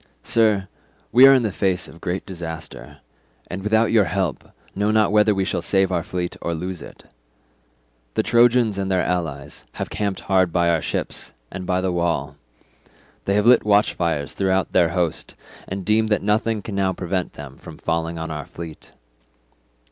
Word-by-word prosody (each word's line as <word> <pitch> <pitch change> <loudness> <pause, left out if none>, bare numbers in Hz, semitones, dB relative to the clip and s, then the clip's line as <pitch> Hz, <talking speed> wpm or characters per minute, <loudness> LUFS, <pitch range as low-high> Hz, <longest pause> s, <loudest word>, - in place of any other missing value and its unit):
Sir, 105 -4 +2 0.4
we 130 +4 +9
are 135 - +8
in 130 - +2
the 110 - 0
face 95 -1 -1
of 85 - -14
great 90 +2 -3
disaster, 80 -8 -8 0.5
and 90 +2 -4
without 110 +3 +2
your 110 -3 +4
help 90 -5 -2 0.2
know 100 +1 0
not 110 -2 +3
whether 105 0 +4
we 95 0 0
shall - - -1
save 95 -1 +2
our 90 -2 +1
fleet 90 +1 -4
or 85 - -2
lose 90 +1 -5
it. - - -12 1.1
The - - +2
Trojans 120 -3 +3
and 95 -1 -2
their 95 -1 +2
allies 80 -6 -3
have - - -5
camped 100 -2 -2
hard 95 -3 +2
by 85 0 +2
our 80 -2 +1
ships - - -4 0.2
and 95 -1 -6
by 90 0 +1
the 95 0 0
wall; 85 -5 -1 0.9
they 100 - +1
have 105 +1 +2
lit 120 0 +6
watchfires 85 -8 +1
throughout 95 -1 0
their 85 -2 +4
host 85 -2 -2 0.3
and 95 -1 -5
deem 110 +1 +3
that 105 -2 +1
nothing 105 +1 0
can 105 - -6
now 95 -1 +1
prevent 90 0 -3
them 70 -2 -10
from - - -11
falling 85 0 -2
on 80 0 -5
our 75 -2 -5
fleet. 85 -2 -10
95 Hz, 180 wpm, -22 LUFS, 85-105 Hz, 1.1 s, we